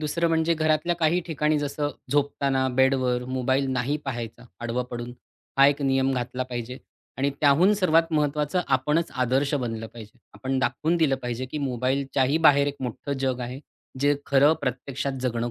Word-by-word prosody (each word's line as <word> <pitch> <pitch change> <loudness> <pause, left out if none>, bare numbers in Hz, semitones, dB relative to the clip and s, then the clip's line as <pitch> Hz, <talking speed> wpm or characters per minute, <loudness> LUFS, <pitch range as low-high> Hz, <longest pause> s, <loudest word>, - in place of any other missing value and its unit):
दुसरं 160 +3 0
म्हणजे 165 0 +2
घरातल्या 155 +2 +1
काही 165 +1 +2
ठिकाणी 155 -2 +1
जसं 145 0 -2 0.2
झोपताना 140 -2 +1
बेडवर 130 -2 +2
मोबाईल 130 +1 0
नाही 130 +3 0
पाहायचा, 120 -2 -5 0.2
आडवं 120 +1 -2
पडून, 120 0 -5 0.5
हा 135 - +8
एक 145 0 +1
नियम 135 0 +2
घातला 125 +1 -3
पाहिजे. 125 0 -6 0.4
आणि 140 +1 +1
त्याहून 155 +7 +5
सर्वात 165 -4 +2
महत्त्वाचं 150 +3 +1
आपणच 150 +5 +1
आदर्श 135 +4 +1
बनलं 115 -5 -3
पाहिजे. 110 +1 -13 0.2
आपण 135 0 -2
दाखवून 160 +5 0
दिलं 155 -5 +2
पाहिजे, 125 +1 -3
की 140 +4 -5
मोबाईलच्याही 135 +2 0
बाहेर 140 0 +4
एक 145 0 -3
मोठं 130 +3 -4
जग 130 -2 -1
आहे, 125 +2 -5 0.4
जे 145 +1 +3
खरं 140 +2 +5
प्रत्यक्षात 135 +2 -3
जगणं 120 -1 -1
135 Hz, 160 wpm, -25 LUFS, 125-150 Hz, 0.5 s, हा